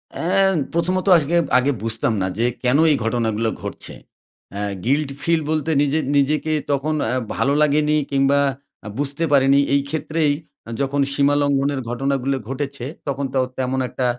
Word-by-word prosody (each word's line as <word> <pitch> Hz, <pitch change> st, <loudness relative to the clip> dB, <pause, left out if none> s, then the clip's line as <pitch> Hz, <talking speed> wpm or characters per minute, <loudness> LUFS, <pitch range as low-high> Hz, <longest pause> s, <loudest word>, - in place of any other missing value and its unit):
অ্যা 190 Hz, +3 st, +2 dB, 0.3 s
প্রথমত 180 Hz, +3 st, 0 dB
আজকে 160 Hz, +1 st, 0 dB, 0.2 s
আগে 130 Hz, +3 st, +2 dB
বুঝতাম 115 Hz, 0 st, 0 dB
না 95 Hz, -, 0 dB
যে 115 Hz, -, +2 dB, 0.2 s
কেন 125 Hz, +2 st, +3 dB
এই -, -, +4 dB
ঘটনাগুলো 115 Hz, -1 st, 0 dB
ঘটছে। -, -, -5 dB, 0.6 s
অ্যা 100 Hz, +1 st, -3 dB, 0.2 s
guilty 140 Hz, +2 st, +1 dB
feel 165 Hz, -1 st, +2 dB
বলতে 155 Hz, 0 st, -1 dB
নিজ 145 Hz, -1 st, +1 dB, 0.2 s
নিজেকে 150 Hz, +3 st, +1 dB, 0.2 s
তখন 140 Hz, +3 st, 0 dB
অ্যা 125 Hz, +3 st, 0 dB, 0.2 s
ভালো 140 Hz, -, +1 dB
লাগেনি 150 Hz, 0 st, +3 dB, 0.2 s
কিংবা 140 Hz, +1 st, +3 dB, 0.5 s
আ -, -, -6 dB
বুঝতে 145 Hz, +3 st, -2 dB
পারিনি 140 Hz, 0 st, +5 dB
এই 140 Hz, -, +4 dB
ক্ষেত্রেই 155 Hz, 0 st, 0 dB, 0.5 s
যখন 140 Hz, +1 st, 0 dB
সীমা 140 Hz, 0 st, +2 dB
লঙ্ঘনের 140 Hz, 0 st, +1 dB
ঘটনাগুলো 135 Hz, +2 st, -1 dB
ঘটেছে, 135 Hz, -2 st, -4 dB, 0.2 s
তখন 140 Hz, 0 st, -2 dB
তো 135 Hz, -, +2 dB, 0.2 s
তেমন 130 Hz, 0 st, -1 dB
একটা 130 Hz, -, -3 dB
140 Hz, 150 wpm, -21 LUFS, 130-150 Hz, 0.6 s, পারিনি